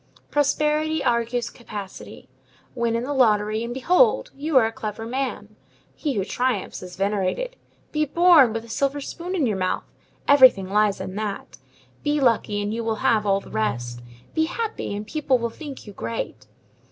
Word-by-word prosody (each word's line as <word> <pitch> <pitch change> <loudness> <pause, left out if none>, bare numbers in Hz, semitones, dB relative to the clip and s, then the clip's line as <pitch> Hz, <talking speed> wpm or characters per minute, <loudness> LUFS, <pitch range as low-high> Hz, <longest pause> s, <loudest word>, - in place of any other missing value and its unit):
Prosperity 300 +2 +1
argues 235 0 0
capacity. 205 -5 -9 0.5
Win 235 -2 0
in 230 - -1
the 285 +3 -2
lottery, 215 -4 +2
and 235 - -4
behold! 360 - +3
you 290 +1 +1
are 240 - +6
a 225 - -1
clever 220 0 -5
man. 230 -4 -4 0.4
He 295 -3 -2
who 200 -5 -1
triumphs 245 -3 -1
is 180 -1 -9
venerated. 200 - -1 0.4
Be 305 0 +1
born 330 -5 +6
with 225 +1 -4
a - - -14
silver 275 +5 -1
spoon 345 +6 -5
in 320 -7 +2
your 210 -5 0
mouth! 185 -1 -1 0.4
everything 260 -9 +6
lies 210 -1 +2
in 185 - -5
that. 210 -2 -5 0.4
Be 295 0 +1
lucky, 230 -5 +2
and 205 +1 -2
you 230 +1 -3
will 225 -1 0
have 215 -2 +3
all 195 0 +2
the - - -14
rest; 120 +3 -2 0.3
be 320 - +2
happy, 440 - -3
and 205 +1 -5
people 275 0 +1
will 235 -1 -3
think 290 +1 -9
you 205 - -10
great. 115 -9 -5
235 Hz, 175 wpm, -24 LUFS, 210-290 Hz, 0.5 s, are